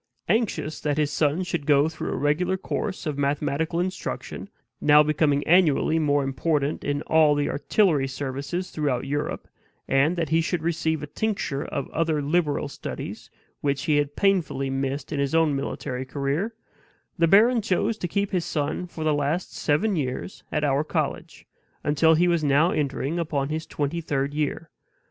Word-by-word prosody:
Anxious 215 -9 0
that 145 -1 -1
his 150 -1 +1
son 150 +4 +1
should 170 -4 -3
go 145 0 +5
through 160 0 -4
a - - -2
regular 155 +7 +1
course 190 0 -4
of 150 -2 -3
mathematical 145 +3 0
instruction, 180 0 -4 0.3
now 150 0 +7
becoming 150 -1 +1
annually 160 -2 +4
more 145 -2 +2
important 140 +2 -1
in 145 0 -1
all 155 -2 +4
the 145 0 0
artillery 150 -3 +2
services 140 +7 -4
throughout 140 -5 -1
Europe, 145 +2 -3 0.4
and 140 +6 +3
that 165 -4 -2
he 165 +1 +3
should 170 -1 -2
receive 160 -2 0
a - - -2
tincture 150 -3 -2
of 140 - -4
other 160 -1 0
liberal 150 0 0
studies 140 - -7 0.3
which 140 -1 -1
he 150 -2 +2
had 145 0 0
painfully 175 -9 +1
missed 135 +3 -3
in 145 - -2
his 140 +2 0
own 160 -3 +3
military 130 -2 -3
career, 145 - -2 0.6
the 165 - +5
baron 225 +6 +5
chose 210 +2 0
to 175 - -2
keep 200 +3 -1
his 180 -3 0
son 155 +2 -2
for 165 -2 -6
the 155 -1 +2
last 145 +5 -1
seven 190 +8 +1
years 135 +4 -4
at 150 - 0
our 140 0 +2
college, - - -3 0.4
until 160 +2 +4
he 175 +3 +3
was 170 -2 +2
now 145 +5 +4
entering 145 +2 -1
upon 145 -4 -1
his 160 +1 -3
twenty 150 +3 -2
third 140 -2 -1
year. 150 +1 -2
150 Hz, 170 wpm, -25 LUFS, 140-170 Hz, 0.6 s, now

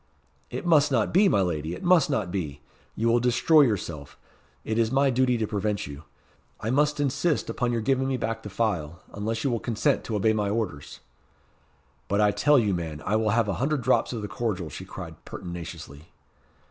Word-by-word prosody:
"It 125 - -5
must 150 -4 +4
not 115 -5 +1
be, 195 +3 +5
my 100 - +3
lady 85 -2 -2
it - - -10
must 175 -5 +4
not 115 -11 -1
be. 75 -7 -4 0.4
You 115 - 0
will 120 +1 +4
destroy 125 +6 +4
yourself. 85 - -1 0.5
It 110 +1 -1
is 115 0 +2
my 135 +1 +3
duty 125 0 +2
to 110 - 0
prevent 105 -1 -2
you. 70 +2 -9 0.5
I 110 - -2
must 150 +2 +2
insist 145 +3 0
upon 125 -1 -1
your 115 -1 -1
giving 130 +3 +1
me 135 -1 0
back 115 -1 -3
the 105 - -8
phial, 90 -6 -2
unless 110 +3 -3
you 135 - +1
will 120 - 0
consent 125 +6 0
to 110 - -3
obey 110 +2 +2
my 105 -2 0
orders." 100 -10 -4 1.1
"But 100 +2 0
I 105 -1 +4
tell 145 +7 +4
you, 105 -6 +2
man, 80 -4 -4
I 105 - +1
will 110 0 +1
have 110 +1 +2
a 100 - 0
hundred 140 -1 0
drops 130 - +2
of 115 -4 -4
the - - -3
cordial," 95 -5 -3
she - - -8
cried - - -9
pertinaciously. 85 -4 -8
110 Hz, 200 wpm, -26 LUFS, 90-130 Hz, 1.1 s, be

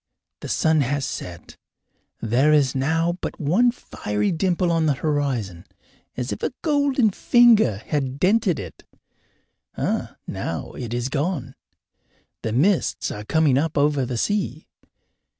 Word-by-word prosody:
The - - -7
sun 160 -1 +2
has 140 +1 -1
set; 85 -8 -7 0.6
there 125 +7 +2
is 145 -4 +3
now 165 +6 0
but - - -5
one 180 +11 +3
fiery 105 - -3
dimple 175 +1 +1
on 165 -1 +2
the 145 - +2
horizon, 130 - -2 0.5
as 125 0 -3
if - - -5
a - - -1
golden 285 -7 +2
finger 225 - +4
had 135 -3 -2
dented 190 -1 +2
it 90 -5 -9 0.9
now - - -4
it 120 -3 -7
is 120 +1 -1
gone; 150 +1 -2 0.9
the 110 - -3
mists 165 - +1
are 105 - -6
coming 150 -1 +3
up 160 0 -2
over 145 -1 +2
the 125 -1 -3
sea. 205 - -1
150 Hz, 135 wpm, -23 LUFS, 130-180 Hz, 0.9 s, finger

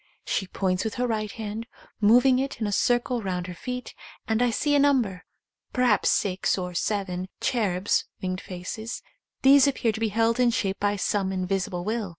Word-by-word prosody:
She 190 - -1
points 185 0 -1
with 220 - -3
her 250 - 0
right 215 -3 -2
hand; 220 +1 -6 0.3
moving 245 +5 +5
it 270 +1 -3
in 220 - -1
a 205 - -1
circle 245 +2 +1
round 180 -3 -3
her 180 - -6
feet, 250 +7 -6 0.3
and 220 +1 +1
I 245 - +3
see 290 +5 0
a 290 - +5
number, 250 -10 +2 0.5
perhaps 250 -5 +3
six 190 -1 +1
or 180 -1 -4
seven, 185 -1 -2
cherubs 205 -6 +1
(winged 185 0 -3
faces); 190 +5 -6 0.4
these 275 +1 +7
appear 255 -4 +1
to 220 - -6
be 225 -1 +1
held 225 +3 +1
in 250 -1 +5
shape 200 -4 -1
by 205 0 +1
some 195 -1 0
invisible 185 -1 -2
will. 215 0 -2
215 Hz, 180 wpm, -26 LUFS, 190-245 Hz, 0.5 s, these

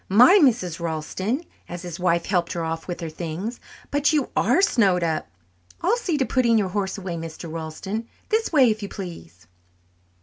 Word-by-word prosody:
My, 250 - +7
Mrs. 185 - +2
Ralston," 170 - -2 0.3
as 175 0 -6
his 175 -1 -6
wife 170 -1 +1
helped 175 -3 0
her 170 - -2
off 165 0 -4
with 175 -1 -5
her 165 - -3
things, 175 +9 -5 0.3
"but 290 0 +3
you 295 -4 +1
are 250 - +3
snowed 190 - +3
up! 160 -2 -1 0.5
I'll 390 +7 +3
see 370 -10 -1
to 265 - +1
putting 240 -4 +3
your 200 -3 +1
horse 195 0 -2
away, 180 -3 -4
Mr. 165 0 -7
Ralston. 165 +8 -5 0.2
This 445 +1 +1
way, 265 -7 +5
if 215 0 -3
you 200 - -5
please." 95 - -9
190 Hz, 180 wpm, -24 LUFS, 170-245 Hz, 0.5 s, My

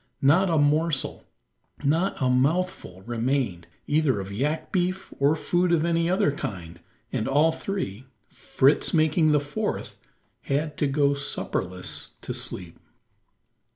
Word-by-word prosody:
Not 170 +8 +5
a 165 - +2
morsel, 150 0 +1 0.6
not 165 +7 +1
a 130 - +1
mouthful 135 - 0
remained 120 -6 -1 0.2
either 145 -7 +2
of 95 0 -6
yak 145 +10 -2
beef 185 0 -1
or 140 +3 +4
food 175 +3 +1
of 165 -1 +3
any 170 0 +1
other 185 -3 +2
kind 90 - -6 0.3
and 110 - -1
all 145 +4 +4
three, 135 - -4 0.2
Fritz 140 +5 +1
making 155 0 +3
the 150 - +4
fourth, 145 0 -4 0.4
had 150 +2 -2
to 145 - +1
go 140 0 +2
supperless 95 -9 -3
to - - -4
sleep. 90 -3 -4
145 Hz, 130 wpm, -25 LUFS, 130-165 Hz, 0.6 s, Not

